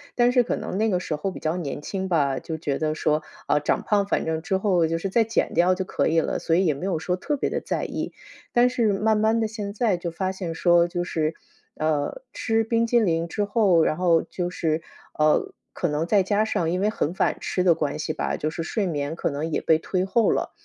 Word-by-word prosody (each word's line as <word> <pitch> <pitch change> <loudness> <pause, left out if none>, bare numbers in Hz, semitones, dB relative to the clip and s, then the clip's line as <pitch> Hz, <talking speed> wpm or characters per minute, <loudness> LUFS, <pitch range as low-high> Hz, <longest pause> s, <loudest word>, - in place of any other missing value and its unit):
但 245 0 +4
是 250 - +4
可 - - -1
能 185 - -4
那 220 +1 +2
个 180 -2 0
时 155 -4 -3
候 190 +5 -2
比 - - -9
较 160 +2 -1
年 150 -4 -4
轻 190 +3 -3
吧， 140 -7 +1
就 160 - -5
觉 145 -3 -2
得 155 -1 0
说， 155 0 0 0.2
啊， 150 - +3
长 150 - 0
胖 205 -2 +2
反 - - 0
正 160 0 -1
之 190 +4 0
后 185 -5 +2
就 165 - -1
是 190 +4 -3
再 225 +3 +3
减 225 - 0
掉 175 +2 +4
就 190 - -2
可 - - -1
以 165 0 +3
了， - - -2
所 165 - +1
以 185 +1 +3
也 155 - +3
没 140 +7 -6
有 190 -4 0
说 180 +3 -2
特 295 +10 -2
别 275 - -1
地 - - -1
在 - - -3
意。 - - -4 0.4
但 245 +1 +5
是 230 -5 +1
慢 215 +2 +2
慢 220 +2 +2
的， 220 - 0
现 205 -2 -5
在 210 -4 +1
就 170 -1 -4
发 190 +2 -2
现 180 -4 -5
说， 175 0 +4
就 175 0 -2
是， 160 -2 -1 0.4
呃， 155 - -1
吃 225 -1 0
冰 230 +1 +1
激 235 0 +3
淋 165 -4 +1
之 205 +4 -2
后， 200 -6 +3
然 155 - +1
后 170 -2 +3
就 180 -1 -4
是， 160 -2 -1 0.4
呃， 155 0 +2 0.2
可 175 - -1
能 150 +2 -1
再 200 +2 +3
加 205 +2 +1
上 170 -6 0
因 180 +2 -1
为 210 - +2
很 170 -7 -1
晚吃 185 0 0
的 175 -2 +5
关 150 -3 -2
系 155 - -2
吧， - - -2
就 155 - -2
是 165 - -5
睡 200 +5 -1
眠 145 -1 -2
可 - - -1
能 150 +2 -3
也 - - -1
被 160 - +4
推 185 +2 -1
后 225 +4 +2
了。 - - -1
180 Hz, 275 characters per minute, -24 LUFS, 160-205 Hz, 0.4 s, 但